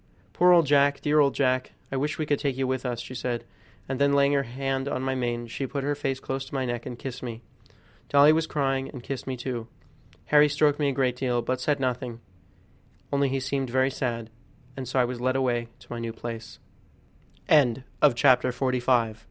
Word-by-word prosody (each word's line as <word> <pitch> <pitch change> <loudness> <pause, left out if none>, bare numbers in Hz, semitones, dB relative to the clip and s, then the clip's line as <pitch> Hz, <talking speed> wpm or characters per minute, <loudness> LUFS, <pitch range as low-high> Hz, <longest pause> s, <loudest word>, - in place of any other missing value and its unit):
"Poor 180 0 +5
old 170 -2 +6
Jack! 140 0 +3
dear 150 0 +3
old 140 -2 +3
Jack! 130 -2 +1 0.2
I - - -2
wish 150 +3 -1
we 155 - -1
could 145 -1 0
take 135 -3 -1
you 135 - 0
with 130 0 -2
us," 120 -2 -3
she - - -9
said, 120 -1 -3 0.4
and 135 +1 -3
then 140 0 +4
laying 140 0 +4
her 140 - +3
hand 135 +2 -3
on 130 -2 -2
my 130 0 0
mane 120 -2 -2
she 130 +3 -4
put 140 -1 -4
her 145 +1 0
face 135 -2 -2
close 135 0 -4
to - - -9
my 130 -1 0
neck 120 0 -4
and 125 -2 -6
kissed 125 0 -6
me. 115 -2 -6 0.7
Dolly 145 +2 +6
was 160 0 +1
crying 135 -3 -1
and 125 -4 -9
kissed 135 0 -5
me 130 -1 -3
too. 120 -2 -4 0.6
Harry 150 0 +5
stroked 150 0 +2
me 145 -2 +2
a - - -1
great 130 -2 +1
deal, 125 -2 0
but 130 +1 -2
said 145 +1 +1
nothing, 125 -2 -2 0.9
only 140 -1 +2
he 135 +1 -1
seemed 135 0 -2
very 130 +2 +2
sad, 115 -4 -3 0.4
and 130 -2 -6
so 130 - -3
I 125 - +4 3.0
wa 125 -3 +3
135 Hz, 185 wpm, -26 LUFS, 125-140 Hz, 3.0 s, old